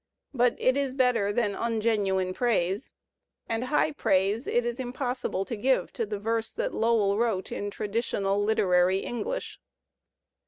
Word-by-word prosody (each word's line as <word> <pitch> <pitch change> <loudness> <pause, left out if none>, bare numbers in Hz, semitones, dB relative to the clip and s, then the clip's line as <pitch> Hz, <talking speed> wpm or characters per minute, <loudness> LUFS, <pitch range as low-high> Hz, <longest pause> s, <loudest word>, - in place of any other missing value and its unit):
But 245 -2 +3
it 255 - +2
is 275 -2 -1
better 245 -6 +2
than 210 -2 0
ungenuine 210 -5 0
praise; 205 -2 0 0.6
and 225 +2 -1
high 295 +3 +2
praise 200 -3 +1
it 240 0 +1
is 240 +1 -3
impossible 250 -5 -2
to 235 - -4
give 260 +5 +1
to 230 -3 -2
the 210 0 -3
verse 225 +2 -2
that - - -2
Lowell 220 -3 +2
wrote 220 -6 0
in 205 - -3
traditional 205 -1 -1
literary 185 -3 +3
English. 475 - -4
225 Hz, 145 wpm, -27 LUFS, 200-245 Hz, 0.6 s, But